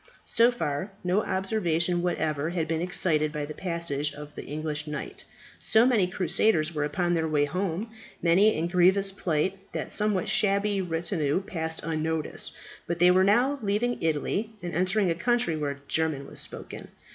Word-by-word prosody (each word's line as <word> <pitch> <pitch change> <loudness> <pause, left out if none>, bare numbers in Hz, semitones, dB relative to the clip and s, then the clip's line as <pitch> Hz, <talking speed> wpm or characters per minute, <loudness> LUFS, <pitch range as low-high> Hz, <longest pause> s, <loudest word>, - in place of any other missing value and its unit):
So 230 +1 +4
far 165 -3 -3
no 180 +3 +2
observation 180 -3 0
whatever 155 -4 -1
had 170 -2 -2
been 160 0 -1
excited 165 -4 +1
by 150 -1 -3
the 150 - -7
passage 170 -5 -2
of 150 0 -10
the - - -7
English 150 0 -3
knight. 150 - -6 0.3
So 220 +2 +4
many 225 -8 +3
crusaders 175 -2 +1
were 150 -2 -1
upon 175 +4 0
their 160 -1 +1
way 150 -2 +2
home, 185 +6 -3 0.3
many 190 +6 +4
in 160 - 0
grievous 190 +3 +4
plight, 185 0 -1
that - - -3
the - - -6
somewhat 210 -3 +1
shabby 200 0 +2
retinue 165 -1 -1
passed 160 -4 -3
unnoticed. 160 0 -2 0.4
But 170 - -1
they 175 +1 +6
were 185 +1 +4
now 245 +8 +3
leaving 215 +4 0
Italy, 165 +7 0
and 175 - -4
entering 185 +2 +1
a - - +2
country 240 -1 +1
where 145 -2 -3
German 155 -4 0
was - - -8
spoken. - - -7
175 Hz, 170 wpm, -27 LUFS, 155-195 Hz, 0.4 s, they